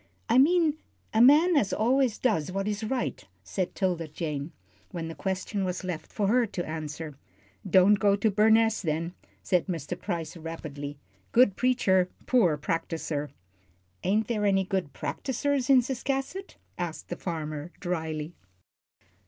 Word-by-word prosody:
"I 255 - +5
mean 315 +1 +4 0.4
a 220 - +4
man 305 +8 +7
as 215 -9 +2
always 250 +1 +2
does 195 - 0
what 195 +2 -2
is 210 +1 -2
right," 245 +3 -2 0.2
said 185 -2 -3
'Tilda 175 -4 -1
Jane, 150 -1 -4 0.4
when 165 -2 -5
the - - -5
question 190 +5 -2
was 185 0 -3
left 180 -4 -5
for 210 - -1
her 240 +2 +3
to 175 -3 -4
answer. 155 -2 -6 0.5
"Don't 195 +2 +6
go 200 0 +4
to 210 +2 +1
Burness, 220 +2 +4
then," 165 0 -2 0.3
said 180 0 +1
Mr. 170 -2 -3
Price, 170 -5 -3
rapidly. 155 -3 -7 0.3
"Good 235 -5 +5
preacher 190 -8 +2 0.2
poor 180 - +3
practiser." 160 -2 -2 0.7
"Ain't 210 +4 +1
there 215 -3 -1
any 195 -1 +3
good 185 -6 -2
practisers 275 0 -2
in 265 -2 +7
Ciscasset?" 270 +9 -3 0.2
asked 170 -3 -4
the 175 - -3
farmer, 155 -2 -5
dryly. 160 -3 -3
190 Hz, 145 wpm, -28 LUFS, 165-230 Hz, 0.7 s, man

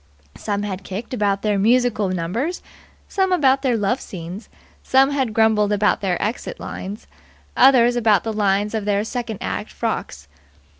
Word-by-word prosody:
Some 205 -1 -3
had 195 -2 -5
kicked 200 +7 -6
about 200 -4 0
their 210 -2 +1
musical 225 -2 +2
numbers, 185 - -3 0.4
some 380 -1 0
about 270 -6 +3
their 255 -4 +1
love 215 +5 0
scenes; 180 +3 -8 0.3
some 270 +1 +3
had 265 -5 0
grumbled 215 -1 +3
about 210 0 +2
their 185 -3 -1
exit 235 - -3
lines, 200 +3 -7 0.5
others 245 -2 +5
about 220 -4 +3
the 225 - -3
lines 205 0 +1
of 220 -2 -2
their 205 0 +1
second 230 -2 -4
act - - -4
frocks. 70 0 -4
215 Hz, 155 wpm, -21 LUFS, 200-245 Hz, 0.5 s, others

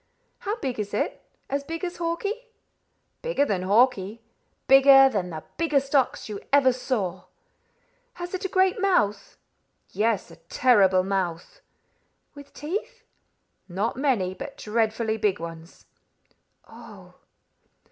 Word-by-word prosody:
"How 410 +2 -3
big 265 - -4
is 205 -1 -3
it? - - -2 0.3
As 280 +1 -2
big 330 +5 -5
as 350 0 -6
Hawkie?" 400 +8 -3 0.7
"Bigger - - +1
than 195 -8 -1
Hawkie; 215 +1 +2 0.4
bigger 270 0 +8
than 195 -7 -2
the 160 -2 -7
biggest 285 -4 0
ox 270 -3 +1
you 210 -2 -6
ever 270 -2 +5
saw." 210 -8 -3 0.9
"Has 355 +1 -7
it 375 - -4
a - - 0
great 375 0 +2
mouth?" 210 - 0 0.5
"Yes, 215 -5 -1
a 165 - -14
terrible 190 +1 +3
mouth." 185 -3 -3 0.7
"With 285 -1 -13
teeth?" 425 +10 -5 0.7
"Not 200 +6 -2
many, 240 -9 0
but 275 +9 -9
dreadfully 220 0 -1
big 205 -3 0
ones." 165 0 -10 0.8
"Oh!" - - -14
250 Hz, 125 wpm, -25 LUFS, 195-300 Hz, 0.9 s, bigger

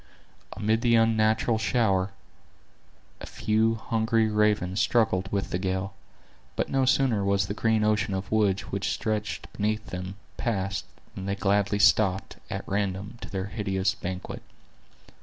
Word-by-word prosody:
Amid 110 +2 0
the 120 -1 +4
unnatural 110 0 +3
shower, 100 -5 +1 1.1
a - - -8
few 110 +1 +1
hungry 110 0 +1
ravens 105 -3 +2
struggled 95 -5 +2
with 100 -1 -2
the 90 - -1
gale; 95 +1 -2 0.6
but - - -1
no 135 -1 +2
sooner 130 -5 +2
was 100 -2 +2
the 100 - -3
green 110 0 +1
ocean 105 -2 +1
of 95 +1 -5
woods 105 -3 +2
which 100 0 -3
stretched 105 -1 -3
beneath 110 +1 -2
them, 90 +1 -5 0.2
passed, 95 -4 -2 0.3
than 95 0 -6
they 100 - 0
gladly 100 +1 +1
stopped, 95 -2 +3
at - - -5
random, 100 +2 -2
to - - -7
their 95 -1 -3
hideous 100 -2 -1
banquet. 90 +1 -6
105 Hz, 140 wpm, -27 LUFS, 95-110 Hz, 1.1 s, the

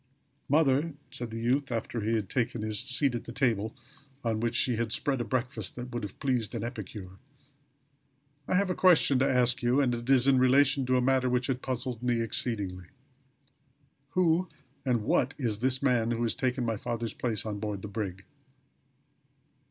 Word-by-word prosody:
"Mother," 145 +1 +3 0.2
said 120 -3 -5
the 115 0 -5
youth, 130 +4 0
after 115 0 -3
he 110 +2 0
had 105 -3 -1
taken 120 -1 -1
his 110 -1 -2
seat 130 +2 +1
at 120 - -4
the - - -7
table, 115 -4 0 0.5
on 115 -2 0
which 115 +1 -1
she 120 -1 +2
had 115 -1 -1
spread 135 +1 0
a - - 0
breakfast 125 +3 -3
that 125 0 -6
should 120 - -2
have 100 -2 -7
pleased 125 -6 -1
an - - -3
epicure. 105 -5 -7 1.3
"I - - +1
have 195 0 +2
a - - +1
question 170 -8 +4
to 135 +1 +3
ask 125 -1 +2
you; 125 +3 +2
and 130 -4 +2
it 120 +1 -5
is 130 -1 +5
in 135 -2 +5
relation 135 +1 +4
to 130 0 +3
a - - +2
matter 130 0 +2
which 125 0 +1
has 130 -2 0
puzzled 125 -2 -3
me 120 -1 +1
exceedingly. 100 -6 -2 1.3
Who 180 0 +3 0.3
and 120 -5 +1
what 125 +5 +1
is 115 -7 -1
this 130 +2 0
man 120 -4 +2
who 120 0 -1
has 115 - +1
taken 125 -1 -1
my 115 -2 -1
father's 115 0 -3
place 115 -4 -1
on 105 -2 -4
board 105 -2 -4
the - - -4
brig?" 100 -2 -5
120 Hz, 190 wpm, -29 LUFS, 115-130 Hz, 1.3 s, is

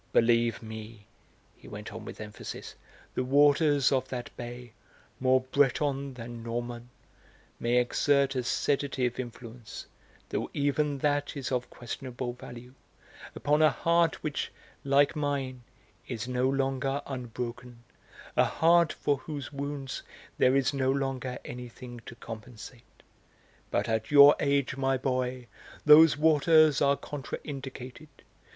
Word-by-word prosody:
Believe 115 0 +3
me," 110 -1 -9 0.5
he - - -16
went 105 0 -8
on 110 0 -8
with - - -9
emphasis, 105 -1 -8 0.4
"the 125 - -1
waters 145 +1 +4
of 130 -2 0
that 125 -2 -6
bay 120 -1 -8 0.5
more 130 0 +3
Breton 140 +1 0
than 120 -1 -8
Norman 120 +1 -5 0.7
may 120 +1 +1
exert 140 +3 +2
a 130 - -1
sedative 130 -1 -1
influence, 120 -3 -8 0.4
though - - -2
even 145 0 +1
that 145 +1 0
is 135 -2 -4
of 125 -1 -1
questionable 125 0 -6
value, 125 -1 -11 0.6
upon 150 +1 +1
a 155 - +7
heart 170 +5 +1
which, 150 -1 -3 0.3
like 140 +2 +3
mine, 140 -4 -2 0.5
is 115 -2 -4
no 125 +1 +1
longer 135 +1 -1
unbroken, 125 -1 -6 0.5
a - - +5
heart 170 0 +4
for 145 - 0
whose 145 +1 -7
wounds 140 -1 -4 0.4
there 130 +1 +4
is 135 0 +2
no 130 -1 0
longer 135 -2 -2
anything 120 0 -8
to 115 - -9
compensate. 115 +1 -11 0.7
But - - 0
at 110 0 -1
your 145 0 +9
age, 140 -2 +1
my 135 -1 +1
boy, 125 -1 -2 0.4
those 150 0 +8
waters 155 -1 +5
are 140 0 +4
contra 140 0 -6
indicated.... 135 0 -8
130 Hz, 130 wpm, -29 LUFS, 120-140 Hz, 0.7 s, your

